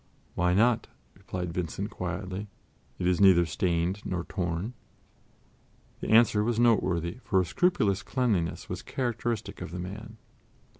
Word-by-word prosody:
"Why 90 +1 +2
not?" 115 +2 +3 0.3
replied 90 -2 -5
Vincent 90 +4 -3
quietly; 95 +2 -4 0.5
"it 90 - -3
is 90 +1 +2
neither 90 -3 +7
stained 85 +4 0
nor 90 -2 -2
torn." 90 +5 -3 1.3
The - - -5
answer 110 -2 +5
was 115 0 0
noteworthy, 95 -6 +2
for 95 - +2
a 90 - +2
scrupulous 100 - +1
cleanliness 105 -11 -1
was - - -5
characteristic 120 -3 -3
of - - -5
the 90 - -6
man. 105 +5 -7
95 Hz, 135 wpm, -28 LUFS, 90-110 Hz, 1.3 s, neither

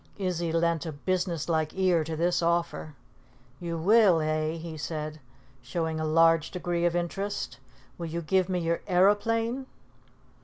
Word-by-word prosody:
Izzy 175 -4 -1
lent 165 0 +1
a - - -3
business 170 +1 -2
like 160 0 -1
ear 180 -4 +3
to 160 0 -4
this 175 +2 +1
offer. 170 -2 -1 0.6
"You 170 -1 -4
will, 195 0 +5
eh?" 155 0 0
he 165 -1 -7
said, 155 0 -5 0.4
showing 160 +5 -2
a 155 - -1
large 165 0 +4
degree 175 -1 -2
of 175 0 +1
interest. 175 -5 -3 0.4
"Will 170 - -3
you 170 +1 -4
give 185 +3 +1
me 185 - 0
your 170 -1 -1
aeroplane?" 225 +7 +2
170 Hz, 150 wpm, -28 LUFS, 160-185 Hz, 0.6 s, will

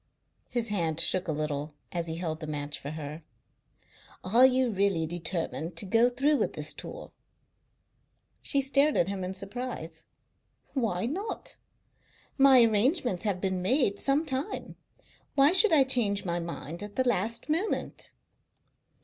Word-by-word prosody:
His 240 -2 -1
hand 165 -6 -1
shook 185 +2 +3
a - - 0
little 150 0 -3 0.2
as 170 -1 -3
he 160 - -4
held 165 -2 -4
the 155 - -7
match 145 -1 -4
for 140 - -7
her. 155 +1 -7 1.0
"Are 235 +8 +6
you 255 -1 +1
really 195 -5 +1
determined 165 0 -3
to 165 - 0
go 230 +5 +4
through 280 +4 +2
with - - -1
this - - -1
tour?" - - -8 1.3
She 280 -1 +2
stared 280 +2 +3
at 175 - +2
him 195 -2 -4
in 185 +1 -4
surprise. 195 -5 -6 0.7
"Why 225 -8 -1
not? 380 - -4 0.8
My 270 -3 +7
arrangements 230 - +1
have 200 -3 0
been 185 -1 -1
made 200 0 +2
some 285 +4 +1
time. 275 +6 -4 0.6
Why 280 +1 +6
should 380 +4 +5
I 300 -4 +6
change 225 -7 +2
my 175 -1 -1
mind 170 -1 -6
at 205 0 -8
the 260 -1 +1
last 230 0 0
moment?" 330 +8 -2
200 Hz, 150 wpm, -28 LUFS, 170-260 Hz, 1.3 s, My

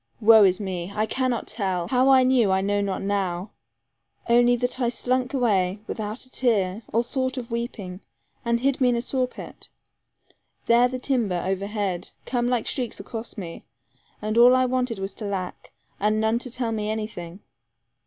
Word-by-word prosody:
Woe 220 0 +7
is 185 -1 +2
me! 185 -2 -4
I 215 0 +1
cannot 255 +1 -1
tell. 190 -5 -2
How 255 +1 +3
I 260 -1 +6
knew 250 -6 +3
I 190 - +3
know 205 +1 0
not 195 -1 -2
now 195 -1 -2 0.8
only 240 +1 +5
that 245 +1 -2
I 240 -2 +2
slunk 255 +1 0
away, 205 -8 +1
without 215 +3 -4
a 255 - -15
tear, 210 -5 +1
or 230 +2 +2
thought 260 +1 -2
of 240 -2 -6
weeping, 210 -5 -5 0.4
and 235 0 +1
hid 275 0 +1
me 250 - +5
in 245 - +2
a 235 - 0
saw 255 0 0
pit. - - -10 1.0
There 240 +1 +5
the 255 +1 -4
timber, 235 -9 0
over 195 +1 -1
head, 200 -4 -3 0.2
came 240 -1 0
like 245 -2 0
streaks 250 -4 -2
across 225 0 -7
me; 170 -4 -7 0.6
and 215 +2 +1
all 245 +2 +8
I 255 0 +3
wanted 250 -2 -1
was 195 0 -4
to 210 - -7
lack, 190 -3 -5 0.3
and 215 +2 +1
none 220 +2 +1
to 255 - -4
tell 240 -1 -2
me 215 -1 -2
anything. 210 -4 -5
225 Hz, 185 wpm, -24 LUFS, 195-250 Hz, 1.0 s, all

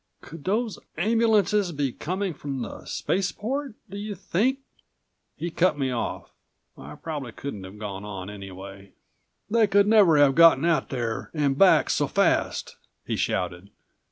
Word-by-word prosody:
"Could 150 -1 -11
those 215 +3 -1 0.2
ambulances 210 -1 +2
be 140 -4 -1
coming 185 +7 -3
from 135 -3 -5
the - - -8
spaceport? 225 +7 -2
Do 200 +1 -7
you 205 0 -5
think 240 +9 0 0.4
" - - -51
He 170 - -4
cut 175 0 +2
me 135 -2 -1
off. 120 - -4 0.4
I 75 +3 -10
probably 145 -7 -6
couldn't 105 -9 -6
have 95 +3 -11
gone 100 -2 -6
on 100 -3 -6
anyway. 95 -1 -10 0.5
"They 225 0 +3
could 200 0 +4
never 205 -7 +5
have 145 -2 +5
gotten 165 -1 +6
out 165 -5 +1
there 120 -4 -3
and 145 -3 +1
back 190 +5 +5
so - - +1
fast!" - - 0 0.3
he - - -2
shouted. 90 +1 -2
155 Hz, 155 wpm, -25 LUFS, -, 0.5 s, gotten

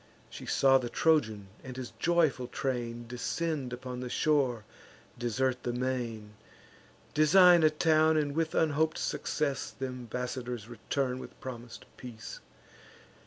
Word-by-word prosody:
She - - -9
saw 135 -1 +5
the 120 -2 -4
Trojan 110 -13 +1
and 130 -1 -8
his 130 -2 -6
joyful 160 -7 +2
train 120 -2 -3
Descend 135 +2 -2
upon 125 0 -6
the 125 0 -5
shore, 130 -7 +1 0.5
desert 125 +2 0
the 120 - -2
main, 120 -4 -3 0.8
Design 175 +3 +7
a 155 - +6
town, 155 0 +3
and, 145 -2 0
with 160 0 0
unhop'd 155 0 +2
success, 145 -3 -2
Th' - - -4
embassadors 125 -2 -4
return 125 +2 -2
with - - -11
promis'd 120 -2 -8
peace. 120 -3 -9
130 Hz, 125 wpm, -30 LUFS, 120-155 Hz, 0.8 s, Design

